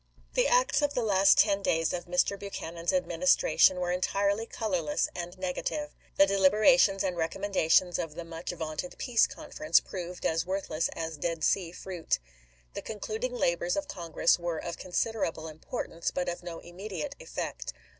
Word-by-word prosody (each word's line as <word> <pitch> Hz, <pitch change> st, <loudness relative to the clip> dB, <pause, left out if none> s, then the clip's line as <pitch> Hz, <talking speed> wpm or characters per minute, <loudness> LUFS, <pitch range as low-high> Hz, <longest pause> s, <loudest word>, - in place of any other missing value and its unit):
The -, -, +3 dB
acts -, -, +3 dB
of 290 Hz, -1 st, 0 dB
the 245 Hz, -, +1 dB
last 195 Hz, -2 st, +5 dB
ten 200 Hz, -1 st, +4 dB
days 165 Hz, -4 st, +1 dB
of 175 Hz, -, -3 dB
Mr. 180 Hz, +3 st, +2 dB
Buchanan's 170 Hz, -4 st, -4 dB
Administration 275 Hz, -, +3 dB
were 175 Hz, -1 st, -1 dB
entirely 200 Hz, +4 st, 0 dB
colorless 180 Hz, -9 st, -1 dB
and 175 Hz, +1 st, -6 dB
nega 185 Hz, -1 st, -3 dB
tive. 295 Hz, -1 st, -3 dB, 0.3 s
The 195 Hz, -, +8 dB
deliberations 200 Hz, +2 st, +4 dB
and 185 Hz, -2 st, -1 dB
recommendations 180 Hz, 0 st, +2 dB
of 165 Hz, -3 st, -4 dB
the 170 Hz, -, -5 dB
much 165 Hz, 0 st, -7 dB
vaunted 160 Hz, 0 st, -4 dB
Peace 240 Hz, -2 st, +3 dB
Conference 305 Hz, 0 st, +1 dB
proved 180 Hz, -1 st, -7 dB
as 165 Hz, 0 st, +1 dB
worth 190 Hz, +2 st, -3 dB
less 155 Hz, +1 st, 0 dB
as 160 Hz, -1 st, -4 dB
Dead 165 Hz, +1 st, -2 dB
Sea 175 Hz, -1 st, +1 dB
fruit. 180 Hz, -2 st, -2 dB, 0.6 s
The -, -, -5 dB
concluding 220 Hz, +3 st, -4 dB
labors 175 Hz, -4 st, +1 dB
of 295 Hz, -1 st, -2 dB
Congress 170 Hz, -1 st, +1 dB
were 170 Hz, -1 st, -2 dB
of 170 Hz, +2 st, -5 dB
considerable 180 Hz, -4 st, -2 dB
importance, 165 Hz, +2 st, -4 dB
but 180 Hz, -, -2 dB
of 175 Hz, 0 st, -3 dB
no 175 Hz, -1 st, -7 dB
immediate 180 Hz, -1 st, -6 dB
effect. -, -, -5 dB
180 Hz, 165 wpm, -29 LUFS, 170-205 Hz, 0.6 s, The